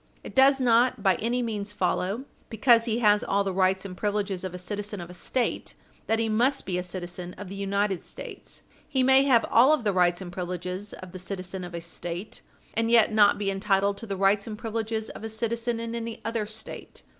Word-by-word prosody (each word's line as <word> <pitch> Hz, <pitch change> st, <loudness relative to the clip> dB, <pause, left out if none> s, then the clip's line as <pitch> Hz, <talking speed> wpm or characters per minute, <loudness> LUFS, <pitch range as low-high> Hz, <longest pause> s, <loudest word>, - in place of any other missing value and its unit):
It -, -, -9 dB
does 270 Hz, +1 st, +5 dB
not 245 Hz, -2 st, +3 dB
by 190 Hz, -2 st, +5 dB
any 240 Hz, +3 st, 0 dB
means 210 Hz, -3 st, -3 dB
follow, 195 Hz, +6 st, -1 dB, 0.2 s
because 230 Hz, +1 st, +4 dB
he 230 Hz, 0 st, 0 dB
has 210 Hz, -2 st, +4 dB
all 200 Hz, 0 st, +1 dB
the 195 Hz, -1 st, -2 dB
rights 190 Hz, +1 st, +2 dB
and 185 Hz, -2 st, -6 dB
privileges 200 Hz, -2 st, -2 dB
of 185 Hz, -, -3 dB
a 180 Hz, -, -6 dB
citizen 205 Hz, +2 st, -5 dB
of 175 Hz, 0 st, -8 dB
a -, -, -10 dB
State, 245 Hz, +7 st, -2 dB, 0.3 s
that 225 Hz, -, +2 dB
he 225 Hz, 0 st, 0 dB
must 235 Hz, +6 st, +1 dB
be 180 Hz, -2 st, -1 dB
a -, -, -1 dB
citizen 180 Hz, 0 st, -6 dB
of 200 Hz, -1 st, -8 dB
the 200 Hz, -, -7 dB
United 200 Hz, -1 st, 0 dB
States. -, -, -9 dB, 0.3 s
He 265 Hz, -3 st, +2 dB
may 265 Hz, +1 st, +6 dB
have 245 Hz, -5 st, +4 dB
all 260 Hz, +6 st, +6 dB
of 305 Hz, -, 0 dB
the 205 Hz, -2 st, +1 dB
rights 180 Hz, -1 st, +3 dB
and 185 Hz, -2 st, -7 dB
privileges 180 Hz, +2 st, -5 dB
of 185 Hz, -1 st, -10 dB
the 185 Hz, -, -8 dB
citizen 185 Hz, 0 st, -5 dB
of 175 Hz, -1 st, -7 dB
a 170 Hz, -, -4 dB
State 175 Hz, +3 st, -6 dB, 0.3 s
and 230 Hz, 0 st, 0 dB
yet 230 Hz, -2 st, +5 dB
not 205 Hz, -2 st, +5 dB
be 200 Hz, -1 st, -1 dB
entitled 200 Hz, 0 st, +1 dB
to 230 Hz, -, -7 dB
the 195 Hz, -2 st, -3 dB
rights 200 Hz, +2 st, +2 dB
and 215 Hz, -1 st, -5 dB
privileges 220 Hz, 0 st, -3 dB
of -, -, -10 dB
a 225 Hz, -, -4 dB
citizen 230 Hz, +1 st, -2 dB
in 230 Hz, 0 st, -4 dB
any 230 Hz, -1 st, -4 dB
other 225 Hz, -2 st, -1 dB
State. 220 Hz, +1 st, -9 dB
205 Hz, 220 wpm, -27 LUFS, 185-230 Hz, 0.3 s, may